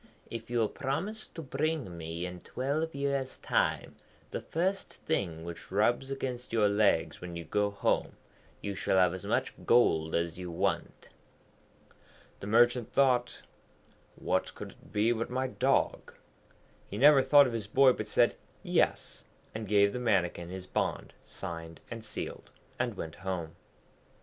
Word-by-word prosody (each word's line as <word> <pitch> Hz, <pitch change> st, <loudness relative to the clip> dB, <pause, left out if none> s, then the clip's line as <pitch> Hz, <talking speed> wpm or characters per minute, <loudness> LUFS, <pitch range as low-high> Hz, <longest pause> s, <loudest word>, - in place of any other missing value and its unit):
'If 115 Hz, 0 st, -6 dB
you 120 Hz, -, -1 dB
will 115 Hz, -2 st, +3 dB
promise 175 Hz, -, -3 dB
to 165 Hz, -, -9 dB
bring 140 Hz, -, -2 dB
me 85 Hz, +1 st, -5 dB
in 90 Hz, 0 st, -6 dB
twelve 145 Hz, +5 st, -2 dB
years' 140 Hz, -1 st, -1 dB
time -, -, 0 dB, 0.4 s
the -, -, -3 dB
first 185 Hz, +4 st, -1 dB
thing 85 Hz, -, -2 dB
which 85 Hz, 0 st, -8 dB
rubs 120 Hz, +6 st, +2 dB
against 130 Hz, -2 st, -4 dB
your 110 Hz, -2 st, +3 dB
legs 100 Hz, -5 st, +2 dB
when 90 Hz, -1 st, -7 dB
you 85 Hz, -, -5 dB
go 105 Hz, 0 st, +1 dB
home, 100 Hz, -, 0 dB, 0.5 s
you 100 Hz, -, -3 dB
shall 95 Hz, -, 0 dB
have 90 Hz, -2 st, +4 dB
as 95 Hz, -, -6 dB
much -, -, 0 dB
gold 80 Hz, -10 st, +3 dB
as 85 Hz, +1 st, -1 dB
you 90 Hz, -1 st, -5 dB
want.' 85 Hz, -, -2 dB, 1.3 s
The 100 Hz, -, -7 dB
Merchant 120 Hz, +2 st, +3 dB
thought, 125 Hz, -3 st, +2 dB, 0.7 s
'What -, -, -1 dB
could -, -, -7 dB
it -, -, -20 dB
be 105 Hz, +2 st, +2 dB
but 115 Hz, -1 st, -1 dB
my 130 Hz, +1 st, -1 dB
dog?' 130 Hz, +1 st, 0 dB, 0.7 s
He 100 Hz, -, -5 dB
never 140 Hz, +3 st, +7 dB
thought 145 Hz, +1 st, +7 dB
of 125 Hz, -, -2 dB
his 110 Hz, -3 st, -3 dB
boy, 130 Hz, +4 st, +5 dB
but 110 Hz, -, -5 dB
said 120 Hz, +2 st, +3 dB, 0.3 s
Yes, -, -, 0 dB, 0.3 s
and 110 Hz, -1 st, -5 dB
gave 100 Hz, 0 st, +4 dB
the 125 Hz, -, -3 dB
Mannikin 90 Hz, -7 st, 0 dB
his 95 Hz, 0 st, -6 dB
bond -, -, -2 dB
signed 80 Hz, -1 st, -7 dB
and 115 Hz, -1 st, -6 dB
sealed, 110 Hz, -, -6 dB, 0.3 s
and -, -, -1 dB
went 80 Hz, -1 st, -6 dB
home. 90 Hz, -4 st, -4 dB
110 Hz, 155 wpm, -30 LUFS, 90-130 Hz, 1.3 s, never